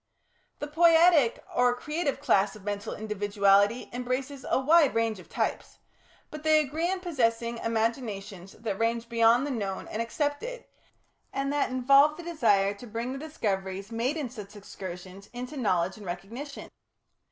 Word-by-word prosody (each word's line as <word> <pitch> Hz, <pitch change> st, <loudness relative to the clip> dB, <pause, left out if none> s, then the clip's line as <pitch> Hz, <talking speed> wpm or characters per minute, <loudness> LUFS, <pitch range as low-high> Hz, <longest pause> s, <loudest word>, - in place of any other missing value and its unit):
The -, -, -4 dB
Poietic 325 Hz, -4 st, +5 dB
or 245 Hz, 0 st, +3 dB
creative 300 Hz, +2 st, -2 dB
class 195 Hz, +1 st, +2 dB
of 210 Hz, -, -13 dB
mental 205 Hz, 0 st, -4 dB
individuality 205 Hz, +1 st, +2 dB
embraces 255 Hz, +2 st, -3 dB
a -, -, +3 dB
wide 295 Hz, -1 st, +4 dB
range 225 Hz, -3 st, 0 dB
of 180 Hz, -, -14 dB
types, -, -, -3 dB, 0.5 s
but 305 Hz, -, -7 dB
they 310 Hz, 0 st, +4 dB
agree 310 Hz, +4 st, -1 dB
in 375 Hz, 0 st, -2 dB
possessing 235 Hz, -8 st, 0 dB
imaginations 220 Hz, -5 st, -3 dB
that 215 Hz, -4 st, -5 dB
range 230 Hz, +1 st, 0 dB
beyond 230 Hz, +2 st, +4 dB
the 290 Hz, -, -3 dB
known 200 Hz, -6 st, -3 dB
and 215 Hz, -, -3 dB
accepted, 295 Hz, -, -3 dB, 0.7 s
and 275 Hz, +1 st, -2 dB
that 290 Hz, -, +1 dB
involve 275 Hz, +4 st, +4 dB
the 345 Hz, -, -8 dB
desire 215 Hz, -12 st, +2 dB
to 225 Hz, +4 st, -12 dB
bring 230 Hz, +4 st, -4 dB
the 270 Hz, -, -6 dB
discoveries 200 Hz, -9 st, -3 dB
made 240 Hz, +7 st, -1 dB
in 275 Hz, -7 st, -4 dB
such 210 Hz, -4 st, -10 dB
excursions, 190 Hz, -1 st, -9 dB
into 250 Hz, +4 st, -6 dB
knowledge 190 Hz, -8 st, 0 dB
and 210 Hz, -, -11 dB
recognition. 230 Hz, +12 st, -7 dB
235 Hz, 155 wpm, -28 LUFS, 205-285 Hz, 0.7 s, Poietic